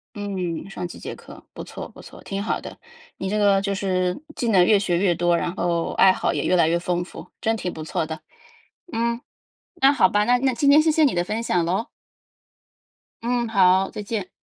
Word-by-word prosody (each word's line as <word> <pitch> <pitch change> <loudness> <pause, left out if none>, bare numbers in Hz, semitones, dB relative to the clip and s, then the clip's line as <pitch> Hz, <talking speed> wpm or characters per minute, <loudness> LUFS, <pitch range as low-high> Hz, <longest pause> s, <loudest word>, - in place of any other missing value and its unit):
嗯， 190 -3 -4
上 180 - -5
几 175 - -8
节 - - -7
课， - - -13
不 - - -7
错 - - -8
不 - - -15
错， - - -13
挺 195 0 -4
好 - - -1
的。 - - -10 0.4
你 190 - -3
这 210 - -1
个 200 -2 +3
就 200 0 -1
是 185 +2 -1
技 235 - -1
能 185 -4 +5
越 210 0 +5
学 180 -3 0
越 180 -2 +2
多， 175 0 +2
然 170 - -2
后 170 -1 -1
爱 190 - +6
好 - - -1
也 - - -2
越 180 - +2
来 165 -2 +4
越 170 +1 +2
丰 175 0 -1
富， - - -11
真 225 -1 0
挺 180 -5 -4
不 160 - -8
错 155 0 -2
的。 160 0 -6 0.7
嗯， 235 +1 -1 0.6
那 275 +1 +7
好 185 -9 +4
吧， 205 0 +2
那 245 +2 +3
那 260 -1 +1
今 280 +3 +3
天 300 +2 +7
谢 315 0 +3
谢 310 0 +3
你 270 - +2
的 175 - +1
分 220 +4 -3
享 180 -6 +1
咯。 195 - -1 1.3
嗯， 240 0 0
好， 190 -2 +4
再 210 - -6
见。 200 -3 -4
195 Hz, 235 characters per minute, -23 LUFS, 175-225 Hz, 1.3 s, 那